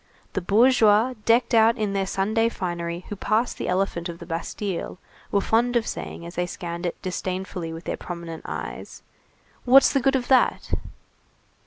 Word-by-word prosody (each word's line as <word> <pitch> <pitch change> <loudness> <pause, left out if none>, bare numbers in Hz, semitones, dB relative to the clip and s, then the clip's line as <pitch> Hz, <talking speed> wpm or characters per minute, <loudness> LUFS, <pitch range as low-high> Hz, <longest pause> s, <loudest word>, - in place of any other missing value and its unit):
The 190 - -1
bourgeois 220 +3 +4
decked 235 +2 +3
out 230 +1 +5
in 210 -3 -1
their 195 -1 0
Sunday 220 +5 +1
finery 175 -3 -4
who 205 - -4
passed 220 +4 0
the - - -3
elephant 180 -2 -1
of 170 - -6
the 170 - -10
Bastille, 175 +3 -4 0.3
were 200 - +2
fond 240 +4 +2
of 235 -2 +2
saying 170 - -6
as 170 - -8
they 175 0 -1
scanned 170 0 -5
it 170 - -5
disdainfully 185 -2 -4
with 165 +1 -8
their - - -3
prominent 170 -2 -7
eyes: 75 -6 -7 0.6
"What's 265 +2 +6
the 275 - +2
good 270 +1 +2
of 250 -2 -1
that?" 260 -2 +2
195 Hz, 170 wpm, -24 LUFS, 170-230 Hz, 0.6 s, What's